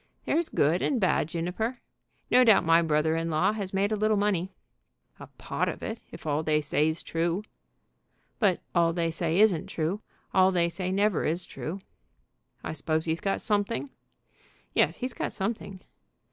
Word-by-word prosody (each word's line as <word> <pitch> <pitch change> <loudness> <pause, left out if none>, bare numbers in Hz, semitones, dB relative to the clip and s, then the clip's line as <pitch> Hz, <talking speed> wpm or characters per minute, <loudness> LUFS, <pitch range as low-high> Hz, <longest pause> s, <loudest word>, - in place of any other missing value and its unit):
"There's 335 0 +1
good 160 +5 +2
and 265 - +1
bad, 185 -6 +2
Juniper. 180 +9 -3 0.5
No 250 +1 +7
doubt 215 -6 +5
my 165 +1 +5
brother 160 0 +1
in 165 0 -1
law 165 +6 +2
has 200 -3 -4
made 195 +2 +1
a - - +2
little 215 0 +2
money." 195 -3 0 0.7
"A - - -9
pot - - -3
of - - -6
it, 225 +1 -4
if - - -11
all 150 0 0
they 155 -1 +2
say's 155 +2 0
true." 170 +4 -1 1.0
"But 195 -6 +2
all 170 -1 +3
they 165 -1 0
say 165 +2 0
isn't 200 -7 +4
true. 170 +6 -2 0.3
All 190 0 +5
they 170 -2 +2
say 185 +1 -3
never 200 -1 +2
is 170 +3 -1
true." 165 +5 -6 0.9
"I - - -4
suppose 155 +1 -1
he's 160 0 -1
got 195 - -1
something?" 215 +6 -1 0.8
"Yes, - - +2
he's 255 0 -4
got - - -3
something." 195 -2 -4
180 Hz, 170 wpm, -28 LUFS, 165-205 Hz, 1.0 s, No